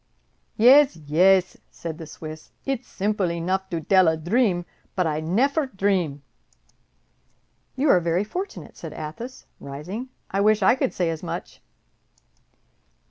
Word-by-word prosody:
"Yez, 260 +2 +7
yez," 180 +5 +3
said 165 -1 -7
the 160 - -8
Swiss; 155 0 -9 0.2
"it's 265 -2 -2
simple 200 -2 -1
enough 185 +3 -2
to 170 - -2
dell 185 +3 +4
a 160 0 +2
dream, 175 +1 +1 0.3
but 180 - +1
I 155 -1 0
neffer 270 - +1
dream." 185 - -1 1.5
"You 275 +3 +1
are 180 - +6
very 170 +2 0
fortunate," 365 - -6
said - - -8
Athos, 230 +12 -7
rising; 175 - -6 0.2
"I 195 - +1
wish 215 0 +3
I 190 - +6
could 260 0 -1
say 175 -2 +1
as 160 - -5
much!" - - -6
185 Hz, 135 wpm, -24 LUFS, 165-230 Hz, 1.5 s, Yez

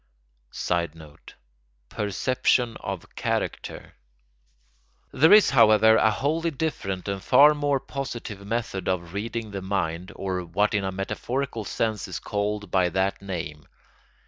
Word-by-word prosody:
[Sidenote: 80 -3 -4 0.5
Perception 120 - 0
of 95 -3 -7
character] - - -3 1.2
There 160 +6 +5
is, 210 0 +7
however, 110 -3 +6
a 110 - +4
wholly 155 +9 0
different 130 - -3
and 100 -1 -3
far 150 +2 +7
more 145 -2 0
positive 120 -7 -6
method 100 -3 -3
of 85 -2 -2
reading 110 +1 -4
the 100 -1 -5
mind, 90 -1 -2
or 95 -2 -3
what 100 +6 0
in 100 -1 +1
a 95 - -2
metaphorical 115 +5 -3
sense 110 -1 -2
is 90 -2 -5
called 105 +1 -3
by 90 -2 +3
that 95 +3 -1
name. 80 -6 -6
105 Hz, 125 wpm, -25 LUFS, 95-120 Hz, 1.2 s, is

